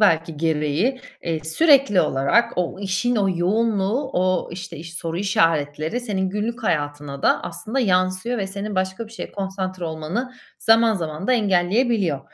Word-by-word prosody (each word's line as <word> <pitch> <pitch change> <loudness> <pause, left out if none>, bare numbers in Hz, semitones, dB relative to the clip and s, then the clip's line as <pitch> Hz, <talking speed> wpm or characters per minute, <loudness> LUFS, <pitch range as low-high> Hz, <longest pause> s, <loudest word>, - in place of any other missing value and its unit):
belki 165 -5 +3
gereği, 160 - 0 0.2
eee, 160 -2 -3
sürekli 275 - +4
olarak 230 - +2
o 180 +1 -1
işin 200 +5 0
o 200 -2 +2
yoğunluğu, 215 +6 +1
o, 185 0 +1
işte, 175 -1 -7
iş 165 +2 -9
soru 165 -1 -4
işaretleri 165 0 +1
senin 190 -6 -2
günlük 230 +4 -3
hayatına 145 -5 -2
da - - +3
aslında 245 +5 -3
yansıyor 185 +3 +1
ve 195 - -1
senin 200 +1 -5
başka 190 +4 -2
bir 220 - -15
şeye - - -7
konsantre 190 -2 -4
olmanı 165 +11 -3 0.3
zaman 225 0 +4
zaman 160 -1 -4
da - - +3
engelleyebiliyor. 200 - +2
190 Hz, 150 wpm, -22 LUFS, 165-225 Hz, 0.3 s, sürekli